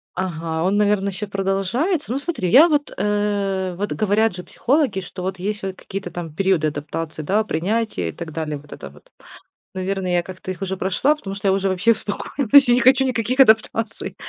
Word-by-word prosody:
Ага, 165 -3 -3
он, 195 +3 +1
наверно, 205 -1 +2
ещё 200 +2 -5
продолжается. 200 - -1
Ну, 265 - 0
смотри, 285 - -2
я 295 - +8
вот, 290 -1 0
э, 200 -2 -1
вот, 205 +1 -2
говорят 215 0 +1
же 180 - -7
психологи, 265 -8 0
что 180 +1 -9
вот 190 +1 -3
есть 210 +3 -3
вот 190 -1 -4
какие-то 195 -2 -6
там 165 -3 -6
периоды 185 -3 +1
адаптации, 155 +2 -5
да, 210 +7 +1
принятия 190 - -1
и - - -5
так 165 -2 -8
далее. 155 -2 -3
Вот 150 +1 -17
это 70 - -9
вот, 75 +2 -20 0.6
наверное, 190 -1 -2
я 175 0 +2
как-то 185 +1 -8
их 190 - -12
уже 190 0 -2
прошла, 195 +11 +1
потому 195 -9 -7
что 195 0 -1
я - - +4
уже 195 0 +1
вообще 190 +5 +2
успокоилась, 260 +5 +2
я 240 - +6
не 250 - +3
хочу 260 +2 +5
никаких 255 +1 0
адаптаций. 220 -2 +2
195 Hz, 195 wpm, -21 LUFS, 180-220 Hz, 0.6 s, я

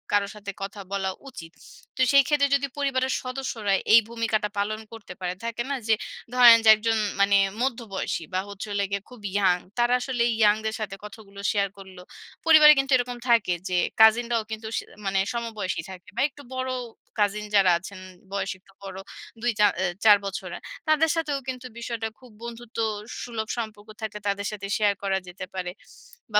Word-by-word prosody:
কারো 200 -1 +2
সাথে 205 -1 -6
কথা 200 +1 -6
বলা 190 -1 -1 0.2
উচিত। 165 -9 -10 0.4
তো 260 - -2
সেই 275 -1 +7
ক্ষেত্রে 290 -2 +3
যদি 280 0 0
পরিবারের 265 -2 0
সদস্যরা 255 -6 -2 0.2
এই 230 - +10
ভূমিকাটা 220 -2 -1
পালন 215 +2 -1
করতে 215 -5 -10
পারে, 180 -1 -2
থাকে 235 +1 -2
না, 280 - 0
যে, 220 - +5 0.4
ধরেন, 240 -2 +9
যে, - - +7
১ 215 - -13
জন 225 - +3 0.2
মানে 200 0 +5 0.2
মধ্যবয়সী 230 -9 -2
বা 185 - +1
হচ্ছে 200 +1 -7
হলো 200 0 0
গিয়ে 200 -1 -1
খুব 245 -4 -13 0.2
young, 180 -3 +3 0.2
তারা 240 +1 +3
আসলে 245 -2 0 0.2
young-দের 220 +1 +3
সাথে 200 -2 -4
কথাগুলো 200 -1 -12
share 200 -2 0
করল। 190 -1 -12 0.5
পরিবারে 305 -2 +9
কিন্তু 270 0 -1
এরকম 245 0 -3
থাকে 225 -6 +4 0.2
যে, 180 - +1 0.2
কাজিনরাও 230 +1 +5
কিন্তু 220 0 -5
সে - - -2 0.2
মানে 195 0 +1
সমবয়সী 220 -7 -3
থাকে 185 0 -12
বা 240 - 0
একটু 285 +2 -15
বড় 260 0 -2 0.5
cousin 210 +1 +1
যারা 190 -2 +6
আছেন, 190 +1 -10 0.3
বয়সে 195 -1 -2
একটু 195 - -24
বড়, 190 -1 -7 0.4
২ 240 0 +2
৪ 205 -1 +6
অ্যা 190 - +1 0.2
৪ 210 -1 +9
বছরের, 195 -1 -5 0.3
তাদের 310 +1 +4
সাথেও 300 -4 -1
কিন্তু 255 -1 -5
বিষয়টা 230 -1 -3
খুব 250 -3 -16
বন্ধুত্ব 235 0 -9 0.5
সুলভ 225 -3 -4
সম্পর্ক 215 -2 -6
থাকলে, 210 -1 -4
তাদের 200 0 -2
সাথে 200 -1 -6
share 205 -2 +2
করা 195 -1 +1
যেতে 180 +1 -7
পারে; 180 -1 -3 0.6
বা 210 - +6
215 Hz, 180 wpm, -25 LUFS, 200-240 Hz, 0.6 s, এই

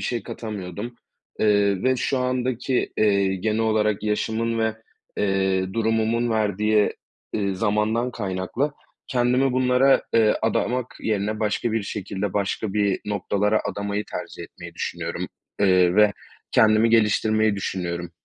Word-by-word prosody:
şey 120 -3 -2
katamıyordum. 105 +2 -6 0.5
Eee, 100 -2 +3
ve 130 0 +2
şu 130 +2 0
andaki, 125 0 -1
eee, 100 -2 +3
genel 110 +4 -1
olarak 110 -2 +1
yaşımın 110 +2 -1
ve, 110 -1 +1 0.4
eee, 95 -1 0
durumumun 115 +1 +1
verdiği, 105 0 +2 0.4
eee, 100 -2 -1
zamandan 110 +4 0
kaynaklı 100 +7 -2 0.3
kendimi 125 +1 +2
bunlara, 130 +1 +4
eee, 110 -2 +5
adamak 120 +2 -1
yerine 105 0 -1
başka 110 +2 0
bir 115 -1 0
şekilde 100 0 -4
başka 100 +1 -1
bir 100 -2 +1
noktalara 105 +1 0
adamayı 100 +1 -3
tercih - - -6
etmeyi - - -11
düşünüyorum. 85 +1 -4 0.3
Eee, 90 -3 +4
ve 105 -1 +6 0.4
kendimi 110 +1 +5
geliştirmeyi 110 -1 +3
düşünüyorum. 85 -3 -3
105 Hz, 120 wpm, -23 LUFS, 100-115 Hz, 0.5 s, ve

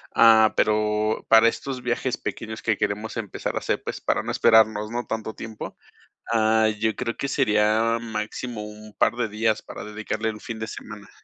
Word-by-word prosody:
Ah, 110 -1 +7
pero 105 0 +1
para 115 +1 +7
estos 130 +1 -5
viajes 125 +1 -1
pequeños 110 +1 -6
que 110 -3 0
queremos 105 +3 -2
empezar 105 -4 -4
a - - 0
hacer, - - -2
pues, - - -5
para - - 0
no - - -3
esperarnos, 110 -2 +4
¿no?, 120 +1 -3
tanto 110 -1 -4
tiempo. 110 -1 -8 0.5
Ah, 110 -1 +3
yo 110 0 0
creo 115 - -3
que 140 - -2
sería 110 -3 +2
máximo 110 0 -5
un 105 0 -11
par - - +3
de 120 -2 0
días 110 +1 0
para - - -9
dedicarle 110 +1 -3
el 105 -1 -6
fin 115 -2 -7
de 110 - -4
semana. 105 -2 -9
110 Hz, 180 wpm, -24 LUFS, 105-115 Hz, 0.5 s, Ah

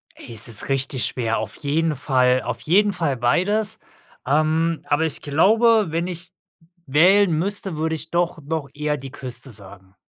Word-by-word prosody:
Ey, 120 - -11
es 115 0 -5
ist 115 +2 -5
richtig 135 -1 -1
schwer, 115 -3 -1
auf 110 -1 -4
jeden 155 +2 0
Fall, 130 -2 +2
auf 120 -1 -4
jeden 200 - +3
Fall 165 -7 -1
beides, 205 - +1 0.5
ähm, 155 +3 +1
aber 145 +1 +1
ich 160 - -4
glaube, 215 +8 +4
wenn 165 +2 -1
ich 180 0 -7 0.6
wählen 180 +7 +5
müsste, 190 +1 -1
würde 160 +1 -1
ich 160 +1 -7
doch 175 0 0
noch 150 -1 -4
eher 150 0 -1
die 135 -1 -9
Küste 125 -2 -6
sagen. 95 -2 -11
150 Hz, 165 wpm, -22 LUFS, 130-175 Hz, 0.6 s, wählen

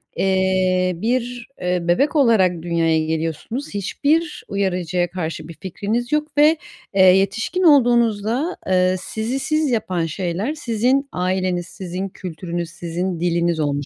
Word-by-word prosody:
eee, 185 -1 +2
bir, 240 +4 -2
eee, 180 0 0
bebek 180 - +1
olarak 195 - +3
dünyaya 165 -2 +1
geliyorsunuz. 160 - -3
Hiçbir 300 - 0
uyarıcıya 180 -3 -1
karşı 165 -3 -4
bir 170 - -9
fikriniz 215 - -3
yok 300 0 -1
ve, 305 +2 +6 0.4
eee, 195 - +3
yetişkin 195 - +3
olduğunuzda, 240 - +3
ııı, 185 0 +3
sizi 225 +7 -3
siz 305 0 0
yapan 185 -7 0
şeyler 185 - -2
sizin 260 +1 0
aileniz, 180 -1 -1
sizin 185 +1 -5
kültürünüz, 170 -1 -5
sizin 175 +1 -4
diliniz 170 -1 +1
olmuş 145 -1 -1
190 Hz, 125 wpm, -21 LUFS, 175-240 Hz, 0.4 s, ve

